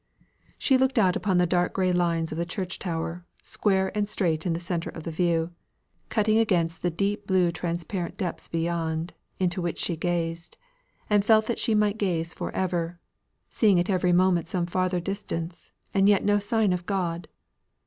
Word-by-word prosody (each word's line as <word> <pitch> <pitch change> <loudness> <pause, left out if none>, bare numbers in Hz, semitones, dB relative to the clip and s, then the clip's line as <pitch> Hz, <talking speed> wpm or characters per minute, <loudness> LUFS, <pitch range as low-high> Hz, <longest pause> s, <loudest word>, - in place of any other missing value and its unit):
She 265 -2 +3
looked 265 0 +2
out 185 -5 +4
upon 190 -4 +1
the 180 - +4
dark 175 0 +1
grey 185 -1 +1
lines 170 -2 +1
of 155 - -4
the - - +1
church 185 0 -4
towers, 165 -1 -3 0.2
square 190 -1 0
and 210 0 0
straight 170 -6 0
in 170 - +1
the 165 - -2
centre 170 -1 -3
of 160 - -8
the 165 - -4
view, 165 0 +1 0.6
cutting 215 0 +2
against 175 -7 +1
the 175 - +1
deep 200 +4 -2
blue 185 -2 +3
transparent 170 +2 -3
depths 185 -4 -4
beyond, 165 0 -2 0.2
into 180 0 0
which 170 -1 -2
she 170 - -1
gazed, 170 0 -2 0.5
and 205 -1 +3
felt 215 0 +5
that 235 - -2
she 225 - +2
might 210 0 +2
gaze 170 -4 -1
for - - -4
ever, 175 -2 -1 0.5
seeing 205 -6 +3
at 175 +3 0
every 180 -1 +2
moment 175 -2 +3
some 180 -2 0
farther 185 0 0
distance, 175 -3 -5 0.2
and 195 0 +4
yet 200 -2 +3
no 205 0 +4
sign 210 -2 +1
of 180 -1 -4
God! 175 -4 -2
180 Hz, 180 wpm, -26 LUFS, 170-200 Hz, 0.6 s, felt